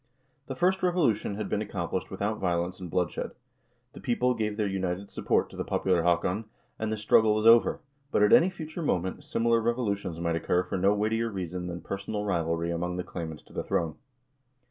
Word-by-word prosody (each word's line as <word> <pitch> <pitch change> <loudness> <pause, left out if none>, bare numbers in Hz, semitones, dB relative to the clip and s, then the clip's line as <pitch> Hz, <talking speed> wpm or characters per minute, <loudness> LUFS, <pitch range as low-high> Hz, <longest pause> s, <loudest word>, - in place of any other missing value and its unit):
The 135 - -4
first 185 +7 +2
revolution 155 - +1
had 105 -1 -3
been 105 - -1
ac 105 - -7
complished 90 0 -2
without 100 +3 -2
violence 90 0 -1
and 90 -2 -7
bloodshed; 90 +1 -1 0.6
the - - -10
people 125 -1 +1
gave 105 -3 -2
their 105 - +1
united 95 0 -2
support - - +1
to - - -11
the - - -2
popular 90 -3 +1
Haakon, 90 +5 +1 0.3
and 110 0 -1
the 110 - -1
struggle 105 +1 +4
was 110 0 0
over, 115 +8 +6 0.3
but - - +3
at 105 - +5
any 180 - +7
future 165 -2 -7
moment, 95 - -1
similar 115 0 +2
revolutions 100 -7 -1
might 85 -1 0
occur 90 +2 +1
for 90 - -5
no 95 +2 +4
weightier 110 +2 0
reason 90 -3 -4
than 85 0 -5
personal 100 +1 -4
rivalry 85 -3 0
among 90 +1 -2
the 90 - -2
claimants 80 -4 -6
to - - -19
the - - -3
throne. 80 -2 0
100 Hz, 195 wpm, -28 LUFS, 90-115 Hz, 0.6 s, any